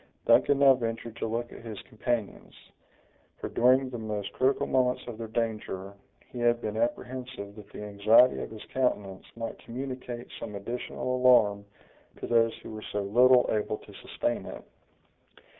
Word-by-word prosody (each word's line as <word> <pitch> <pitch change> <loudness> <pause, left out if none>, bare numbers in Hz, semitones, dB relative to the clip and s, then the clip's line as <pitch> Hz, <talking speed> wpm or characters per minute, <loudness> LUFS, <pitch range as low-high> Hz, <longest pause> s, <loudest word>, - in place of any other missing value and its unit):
Duncan 145 - +5
now 140 -1 +7
ventured 115 -2 -4
to - - -2
look 120 +2 -3
at - - -11
his 110 -3 -7
companions; 115 -2 -3 0.8
for, - - -5
during 130 +2 +3
the 120 - -5
most 105 -2 -4
critical 130 +2 +2
moments 125 -1 +1
of 115 -2 -8
their 115 - -4
danger, 110 -4 -3 0.4
he 125 - -7
had 120 0 +3
been 110 -2 -4
apprehensive 120 -2 -3
that 105 -2 -13
the - - -8
anxiety 105 +5 +4
of - - -5
his 110 -1 -10
countenance 105 -7 -1
might 115 0 -5
communicate 125 0 -6
some 105 - -6
additional 120 +4 -3
alarm 105 -6 +4 0.5
to - - -6
those 115 -1 +3
who - - -8
were 110 0 -7
so 105 - -1
little 125 +5 +5
able 105 0 -1
to - - -15
sustain - - -3
it. - - -8
115 Hz, 160 wpm, -28 LUFS, 105-125 Hz, 0.8 s, now